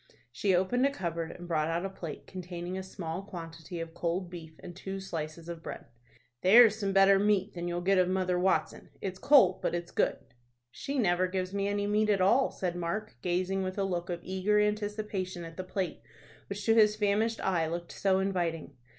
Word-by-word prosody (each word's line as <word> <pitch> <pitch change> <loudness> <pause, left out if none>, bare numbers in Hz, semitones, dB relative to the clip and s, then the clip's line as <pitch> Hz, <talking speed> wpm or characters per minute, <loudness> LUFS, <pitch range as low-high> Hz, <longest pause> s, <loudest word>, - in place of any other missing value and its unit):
She 185 +9 +1
opened 190 +8 +2
a - - +1
cupboard, 170 -8 -3
and 175 +1 -9
brought 155 -2 +1
out 170 +3 -1
a - - -2
plate 170 -5 -7
containing 180 -1 -6
a 190 - -3
small 185 -2 -5
quantity 165 -3 -8
of 165 0 -6
cold 175 +2 -2
beef, 160 -3 -10
and 175 - -8
two 190 +1 -5
slices 165 -3 -6
of 170 -1 -6
bread. - - -7 0.6
"There's 220 +3 +8
some 200 -3 -2
better 195 0 +6
mate 205 -1 +2
than 175 0 -4
you'll 175 0 -2
get 190 +1 +3
of 180 0 +3
Mother 185 -1 +1
Watson. 185 +1 0
It's 190 -1 -5
cold, 265 -10 +5
but - - 0
it's 170 0 -5
good." - - +1 0.5
"She 280 - -4
never 185 -5 +2
gives 185 0 -3
me 200 0 0
any 205 0 0
meat 210 +1 +2
at 200 -2 +3
all," 235 +9 +4
said 180 -2 -3
Mark, 175 +5 -3
gazing 185 +2 0
with 185 +1 -3
a 200 - +1
look 175 -2 -2
of 175 -1 -3
eager 190 +3 +1
anticipation 210 -3 -2
at 165 0 -9
the 185 - -4
plate 185 -2 -3 0.5
which 200 0 -5
to 225 - +5
his 210 -2 +5
famished 215 +2 +1
eye 170 -4 +1
looked 170 +1 -5
so 190 -1 +1
inviting. 175 -6 -1
185 Hz, 200 wpm, -30 LUFS, 175-200 Hz, 0.6 s, There's